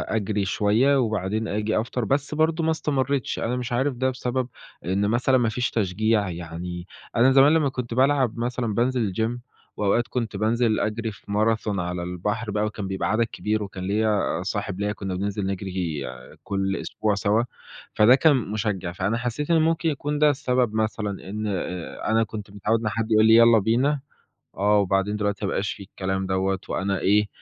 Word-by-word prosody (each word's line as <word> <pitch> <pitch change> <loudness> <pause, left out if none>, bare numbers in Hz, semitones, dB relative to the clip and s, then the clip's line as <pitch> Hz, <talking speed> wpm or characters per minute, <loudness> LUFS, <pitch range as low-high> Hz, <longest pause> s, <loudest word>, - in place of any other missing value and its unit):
أجري 105 -1 0
شوية، 110 +9 +3
وبعدين 110 -2 -1
آجي 105 +2 0
أفطر، 115 +1 -2
بس 140 +4 -1
برضه 160 +1 +1
ما 160 - +2
استمريتش 140 -4 -1
أنا 120 +2 -1
مش 125 0 -4
عارف 130 +3 +1
ده 130 +2 +1
بسبب 125 0 -2 0.4
إن 100 +3 +1
مثلًا 125 +3 +3
ما 120 -2 +2
فيش 125 +2 -1
تشجيع، 105 0 +1
يعني 85 +1 -6 0.3
أنا 125 +3 +5
زمان 135 +3 +6
لما 155 -4 +3
كنت 125 -2 -5
بالعب 130 -2 +2
مثلًا 120 -1 -2
بانزل 120 -3 0
الGym 115 +5 -1 0.4
وأوقات 105 +4 +1
كنت 115 -5 -3
بانزل 110 +1 +1
أجري 110 +1 -2
في 100 - -15
Marathon 105 -1 +1
على 90 0 -3
البحر 105 +5 -3
بقى، 105 +1 0
وكان 105 -2 -4
بيبقى 95 0 -2
عدد 110 +2 +3
كبير، 110 -1 -2
وكان 95 -2 -7
ليّا 105 -1 +1
صاحب 100 -1 -3
ليّا 105 0 0
كنا 95 -2 -4
بننزل 100 +1 -2
نجري 95 -5 -3 0.4
كل 95 -1 -1
أسبوع 105 -2 -1
سوا، 105 +3 +2 0.5
فده 110 +4 +6
كان 150 +1 +4
مُشجع، 105 -5 -2
فأنا 95 +5 -1
حسيت 125 +6 -2
إنه 165 - +5
ممكن 165 +1 +2
يكون 145 0 -2
ده 150 0 +6
السبب 125 -4 +1
مثلًا 110 -1 -1 0.2
إن، 105 +1 -3
آآ، 90 -3 -4
أنا 115 0 +4
كنت 105 -2 -7
متعود 105 +3 0
إن 110 - -1
حد 115 +2 -3
يقول 110 0 +5
لي 110 - +6
يالّا 115 -1 +7
بينا 130 +8 +1 0.6
آه، 105 +2 +3
وبعدين 100 +1 +1
دلوقتي 105 -1 -1
ما - - -1
بقاش 100 +2 -1
في - - -10
الكلام 95 0 -3
دوّة، 95 0 0
وأنا 95 0 -1
إيه 105 +2 +3
110 Hz, 180 wpm, -24 LUFS, 100-125 Hz, 0.6 s, يالّا